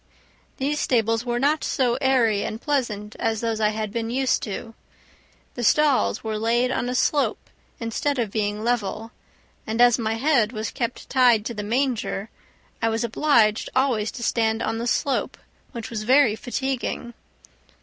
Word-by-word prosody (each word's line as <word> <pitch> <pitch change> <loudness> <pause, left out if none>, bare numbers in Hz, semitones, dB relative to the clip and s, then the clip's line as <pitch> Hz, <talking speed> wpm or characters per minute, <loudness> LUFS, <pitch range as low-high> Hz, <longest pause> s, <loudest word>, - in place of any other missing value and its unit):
These 295 +2 -1
stables 225 -1 +1
were 240 0 0
not 290 +5 +1
so 250 -3 +1
airy 240 -6 +3
and 215 - -4
pleasant 230 -8 -2
as 225 -1 0
those 225 -1 -2
I 210 - +4
had 215 -1 -4
been 230 -1 -2
used 260 +2 +1
to. 225 +2 -6 0.8
The 245 - -5
stalls 260 - +3
were 220 -1 -3
laid 240 +3 +1
on 245 - -1
a 250 - -2
slope 285 +3 0 0.3
instead 245 +5 -1
of 230 -5 -1
being 210 0 -2
level, 225 -1 -2 0.6
and 220 +1 -2
as 245 0 +6
my 225 -1 -1
head 245 -3 +2
was 215 0 -3
kept 235 -1 -4
tied 245 -5 +4
to 235 - -3
the 210 - -4
manger, 225 -2 -1 0.5
I 225 - +2
was 225 +1 -1
obliged 230 -3 +2
always 250 -5 +1
to 235 - -7
stand 225 -1 +1
on 225 +1 -2
the 235 - -2
slope, 270 +2 0 0.3
which 230 -3 -7
was 220 -2 -3
very 250 0 +4
fatiguing. 250 0 -3
230 Hz, 165 wpm, -24 LUFS, 220-255 Hz, 0.8 s, as